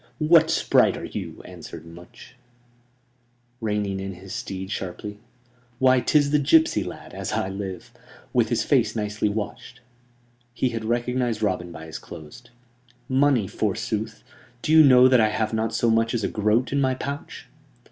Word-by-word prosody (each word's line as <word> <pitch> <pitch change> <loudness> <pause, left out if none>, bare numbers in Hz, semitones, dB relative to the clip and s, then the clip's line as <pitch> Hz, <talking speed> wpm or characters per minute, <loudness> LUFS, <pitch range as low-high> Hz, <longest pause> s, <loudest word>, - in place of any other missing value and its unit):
"What 160 +1 +5
sprite - - +3
are - - -6
you?" - - -7
answered 85 -2 -10
Much, 85 +7 -14 1.3
reining 105 -3 -1
in 95 0 -5
his 95 +3 -10
steed 95 -4 -5
sharply. 105 +2 -6 0.6
"Why! 130 0 +4
'tis 145 +2 +2
the 150 - +4
gipsy 160 +3 +3
lad, - - -9
as - - -4
I 95 - -1
live; 95 -2 -6 0.4
with - - +2
his - - +1
face - - +2
nicely 105 -1 -1
washed...!" 110 +4 -6 0.8
He 125 - +1
had 115 -2 -5
recognized 120 -1 -1
Robin 90 -4 -1
by 80 -1 -9
his 80 - -7
clothes. 80 +10 -11 0.7
"Money, 135 -4 +3
forsooth! - - -3 0.4
Do - - -1
you 160 0 +8
know 130 -2 +7
that 130 -2 +5
I 110 - +3
have 110 +1 -2
not 110 0 0
so 115 - +1
much 115 +1 +1
as 115 - -2
a - - +1
groat 110 +3 +1
in 140 0 +1
my 130 -1 +1
pouch?" 140 +2 -6
110 Hz, 160 wpm, -24 LUFS, 95-130 Hz, 1.3 s, you